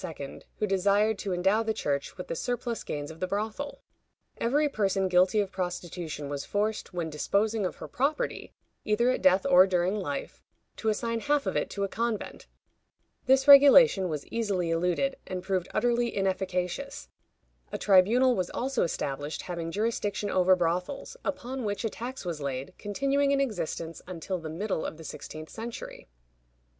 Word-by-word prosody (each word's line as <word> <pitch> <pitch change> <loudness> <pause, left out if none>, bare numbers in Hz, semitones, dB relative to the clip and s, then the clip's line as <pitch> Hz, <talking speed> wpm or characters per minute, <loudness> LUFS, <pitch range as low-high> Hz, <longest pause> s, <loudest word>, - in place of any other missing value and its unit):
who 215 - 0
desired 200 +2 +2
to 200 - -3
endow 190 +5 +2
the 220 -1 -1
Church 140 -7 -2
with 180 - -6
the - - -3
surplus 240 +2 -3
gains 145 +1 -4
of 160 - -12
the 185 - -1
brothel. 220 +9 -4 0.5
Every 290 +6 +2
person 195 -7 0
guilty 185 +3 +4
of 200 -2 0
prostitution 175 -5 -4
was 140 0 -4
forced, 210 +1 -2
when 170 -3 -3
disposing 200 +7 +1
of - - -7
her - - -8
property, 300 - -1 0.3
either 235 +4 +2
at - - -2
death 185 0 +4
or 185 +1 +7
during 180 0 +1
life, 165 -10 -4 0.4
to 220 - 0
assign 230 +1 -1
half 290 +3 +1
of - - -2
it - - 0
to 200 - -3
a - - +1
convent. 230 +1 -3 0.8
This 265 +2 +4
regulation 275 -9 +8
was 150 -3 -4
easily 195 -7 -1
eluded, 180 +11 0
and 185 -1 -4
proved 185 -3 -1
utterly 240 -2 +1
inefficacious. 185 - -2 0.6
A - - -2
tribunal 225 +7 +4
was 180 -3 -1
also 265 0 -1
established 145 -2 -2
having 170 -2 -4
jurisdiction 205 0 -1
over 185 0 +5
brothels, 180 - -2
upon 260 -1 -4
which 205 +1 -2
a 220 - -1
tax 250 -1 -6
was 165 -4 -4
laid, 135 -1 -4
continuing 275 +7 +1
in 280 - +2
existence 170 - -3
until 180 +1 -4
the 160 -1 -6
middle 185 +2 -2
of 155 - -5
the 160 - -10
sixteenth 155 +1 -8
century. 230 +1 -7
195 Hz, 165 wpm, -28 LUFS, 175-230 Hz, 0.8 s, regulation